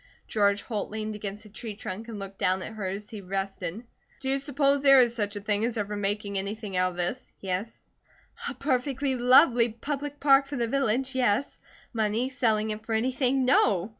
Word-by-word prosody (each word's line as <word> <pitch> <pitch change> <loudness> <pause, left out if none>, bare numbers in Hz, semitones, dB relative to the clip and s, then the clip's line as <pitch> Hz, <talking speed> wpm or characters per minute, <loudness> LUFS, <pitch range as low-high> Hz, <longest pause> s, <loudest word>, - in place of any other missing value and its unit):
George 200 -1 +2
Holt 215 -4 -3
leaned 215 0 -4
against 210 +1 -6
a - - -12
tree 215 0 -7
trunk 210 +2 -6
and 225 -2 -6
looked 195 -1 -8
down 185 0 +1
at - - -7
her 210 -3 -4
as 200 +4 -5
he 215 -2 -7
rested. 195 +2 -4 0.4
"Do 265 - -3
you 275 +1 +1
suppose 280 0 +2
there 275 -1 +8
is 240 -2 +4
such 210 -3 -2
a 205 - -5
thing 205 +1 0
as 235 0 -1
ever 210 0 -2
making 205 0 -2
anything 205 0 -5
out 185 0 +2
of - - -13
this?" 180 +9 -3
he 190 - -6
asked. 200 +6 -3 0.7
"A - - -6
perfectly 270 +1 0
lovely 245 -1 +5
public 285 +5 -5
park 275 -1 +5
for 285 - -5
the 235 -3 0
village, 265 +1 0
yes; 255 0 +1 0.3
money, 225 +3 0
selling 220 -5 +1
it 215 0 -6
for 225 - -3
anything, 260 +2 +1
no! 205 -7 +3
220 Hz, 200 wpm, -27 LUFS, 205-260 Hz, 0.7 s, there